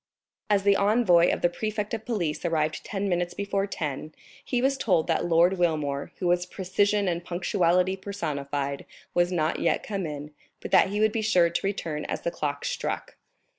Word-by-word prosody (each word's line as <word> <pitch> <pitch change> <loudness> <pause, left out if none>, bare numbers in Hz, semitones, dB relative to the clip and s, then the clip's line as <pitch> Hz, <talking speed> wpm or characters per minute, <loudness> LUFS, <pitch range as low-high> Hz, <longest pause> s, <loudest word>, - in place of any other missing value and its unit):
As 200 -2 +3
the 200 0 +5
envoy 200 -5 +4
of - - -2
the - - +6
prefect 210 +4 -3
of 220 -1 -4
police 175 -11 -2
arrived 160 -2 0
ten 200 -1 -3
minutes 175 -1 -1
before 200 0 -1
ten, 155 -4 -5 0.3
he 250 - -1
was 270 +2 +2
told 180 -11 +2
that - - 0
Lord 175 +2 +4
Wilmore, 150 -5 0
who 185 - -4
was 175 0 +2
precision 200 +2 +1
and 170 -1 -1
punctuality 180 +1 +1
personified, 145 -8 -4 0.3
was 175 +1 +2
not 160 -2 0
yet - - +1
come 195 -5 -3
in, 150 0 -7 0.3
but - - -8
that - - +6
he 205 +1 -2
would 215 0 +4
be 225 - -1
sure 180 -6 +3
to - - -1
return 160 -6 -3
as - - -3
the 170 - -2
clock 145 -3 -3
struck. - - -3
180 Hz, 185 wpm, -26 LUFS, 160-200 Hz, 0.3 s, the